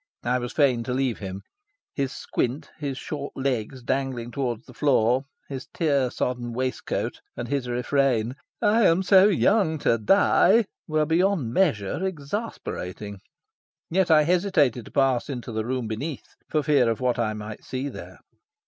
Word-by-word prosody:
I 125 +1 +1
was 120 0 -4
fain 135 -6 +3
to 125 - -2
leave 130 -3 0
him. 95 -1 -6 0.5
His 135 -2 -1
squint, 130 +4 -3
his 140 -3 -3
short 145 -1 -6
legs 130 -1 -2
dangling 125 -2 -2
towards 125 -5 -3
the 125 - -14
floor, 130 -1 +2 0.2
his 135 -2 -6
tear 140 -6 +2
sodden 120 -1 -3
waistcoat, 130 +1 -2 0.2
and 120 - -4
his 135 -2 -1
refrain 125 -1 +1 0.3
"I 215 0 +5
am 170 +3 +3
so 190 +1 +7
young 195 -4 +3
to 115 - +3
die," 205 - +4 0.2
were 155 -1 +1
beyond 165 - +1
measure 140 - +1
exasperating. 140 - -5 0.7
Yet 185 +1 +2
I 155 -1 +6
hesitated 155 - +2
to - - -13
pass 135 -1 +2
into 125 -3 -5
the 110 0 -2
room 125 -1 -2
beneath, 135 +8 -5 0.2
for 155 -1 +1
fear 140 -6 +3
of 115 - -1
what 125 -2 0
I 110 -2 0
might 105 0 -7
see 130 +2 -4
there. - - -9
130 Hz, 155 wpm, -25 LUFS, 120-155 Hz, 0.7 s, so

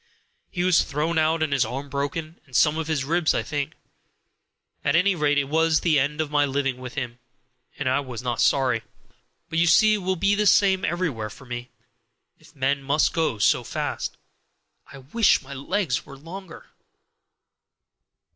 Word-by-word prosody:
He 175 - -2
was 180 -2 +4
thrown 160 +3 -1
out 155 +1 +2
and 150 -3 -1
his 135 - +3
arm 130 +5 -5
broken, 145 +4 -4
and 130 - -12
some 150 -1 +4
of 160 -1 -3
his 155 -4 0
ribs, 165 +2 +1
I - - 0
think. 145 -2 -3 1.1
At - - +2
any 185 +4 +4
rate, 150 -4 +1
it 145 - +3
was 160 +2 +2
the 155 -4 +3
end 145 +3 -1
of 155 -2 -2
my 145 -1 +3
living 135 -2 -1
with 125 -1 -9
him, 125 -3 -4 0.6
and 145 - -3
I 130 +1 +2
was 125 -4 -6
not 120 -3 -1
sorry. 130 -4 +2 0.7
But 165 -1 -1
you 170 - +3
see 215 +6 +6
it - - +2
will 190 -1 -1
be 200 +3 +2
the 210 0 +2
same 190 -1 +4
everywhere 150 -12 -2
for 135 +5 -13
me, 120 0 -6 0.7
if - - -20
men 140 +1 0
must 140 +3 +1
go 160 -9 0
so 105 - +3
fast. - - -4 0.7
I 140 - -10
wish 150 - +2
my 140 +1 -9
legs 175 +8 -1
were 140 - -12
longer!" 170 +4 -11
150 Hz, 180 wpm, -24 LUFS, 135-165 Hz, 1.1 s, see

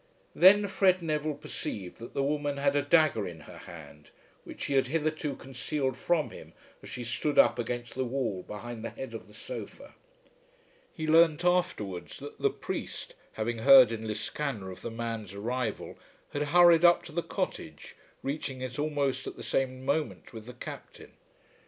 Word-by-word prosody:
Then 200 +3 +7
Fred 185 -2 +3
Neville 155 -1 -1
perceived 105 - -6
that 115 - -10
the 140 - +1
woman 145 0 -1
had 140 0 +2
a 145 - +3
dagger 145 -7 +3
in 85 -3 -9
her - - -12
hand 75 -3 -12 0.4
which - - -8
she 140 - -2
had 135 -2 +3
hitherto 155 -1 -1
concealed 130 +1 -3
from 155 +3 0
him - - -12 0.3
as - - -11
she 125 - -5
stood 120 +6 -1
up 120 - +6
against 120 0 -3
the 130 - -1
wall 120 -7 -2
behind 110 +3 -7
the 115 - -3
head 130 -3 -8
of 115 - -8
the 105 - -17
sofa. 120 - -8 1.0
He 160 - -5
learnt 160 +1 +5
afterwards 105 - 0
that - - -10
the - - +4
priest, - - -5 0.2
having 115 +1 -2
heard 130 -1 +8
in 110 -1 -4
Liscannor 110 -1 -3
of 90 - -11
the - - -4
man's 115 -3 -5
arrival, 115 +2 -3 0.3
had 145 0 -1
hurried 175 0 +7
up 175 0 +6
to - - -10
the 170 +2 -1
cottage, - - -5 0.3
reaching 135 -2 -3
it 130 +1 -5
almost 145 -3 -1
at - - -6
the - - -9
same 130 -1 -1
moment 150 -1 -2
with 110 0 -9
the 125 - -8
Captain. 120 - -10
130 Hz, 175 wpm, -29 LUFS, 115-150 Hz, 1.0 s, heard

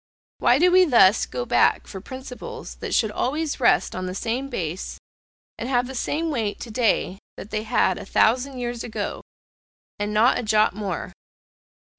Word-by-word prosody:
Why 245 - +4
do 355 +4 +4
we 370 0 +6
thus 220 - +5
go 125 -1 -4
back 120 - +3
for 190 - -8
principles 260 - -8
that - - -3
should 220 -3 +2
always 295 +8 -2
rest 245 - +3
on 185 0 -3
the 185 - -5
same 240 +6 -2
base, 180 - -4 0.6
and 240 - -4
have 245 -2 +2
the 265 - -7
same 315 +5 -1
weight 220 -7 -2
to 235 - -7
day 215 -4 +1 0.2
that 205 - -9
they 215 - -1
had 215 -4 +1
a - - -8
thousand 255 +6 +2
years 240 -1 -4
ago 230 - -4 0.8
and 205 0 -2
not 220 +4 +4
a - - -1
jot 215 -3 +3
more? 200 -3 -4
235 Hz, 175 wpm, -23 LUFS, 205-260 Hz, 0.8 s, we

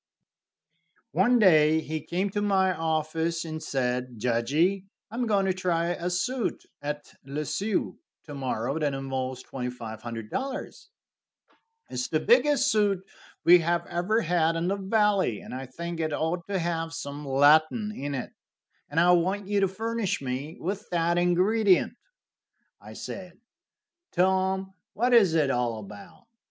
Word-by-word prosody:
One 245 0 +4
day 160 -7 +5
he 155 0 -4
came 180 +6 -2
to 205 - -1
my 190 -2 +2
office 160 +1 -1
and 155 -1 -5
said: 125 -3 -2
"Judgey, 140 - +1 0.3
I - - -7
am 245 0 -1
going 200 -3 +2
to 190 - +2
try 175 -2 0
a 175 0 -2
suit 235 +7 -2 0.2
at 145 0 -5
Le 140 +3 -4
Sueur 200 +8 -1 0.3
to 150 - -10
morrow 135 +1 -2
that 145 -3 0
involves 130 -1 -4
$2,500. 120 - -5 1.2
It - - -13
is - - -2
the - - 0
biggest 295 - +4
suit 200 -3 +1 0.4
we 175 +1 +8
have 170 +1 0
ever 195 +7 0
had 165 -2 +1
in 170 +2 -1
the 195 - +1
valley, 200 - +1
and - - -10
I 130 +1 -5
think 170 +6 -6
it 155 -2 -1
ought 165 +3 -2
to 200 -1 -1
have 165 -2 -2
some 145 -2 -6
Latin 155 - +4
in 140 +1 -4
it, 125 - -5 0.6
and 145 - 0
I 175 +1 +5
want 190 +3 +1
you 205 0 +1
to 195 - +3
furnish 225 +1 -2
me 135 +4 -5
with 195 +4 -4
that 170 0 +1
ingredient." 185 +3 +3 0.9
I - - -11
said: 185 -2 -8 0.8
"Tom, 190 +1 +1 0.2
what 245 +4 +1
is 200 -9 +6
it 150 -4 +3
all 120 -2 0
about? 105 - -12
170 Hz, 150 wpm, -27 LUFS, 145-195 Hz, 1.2 s, we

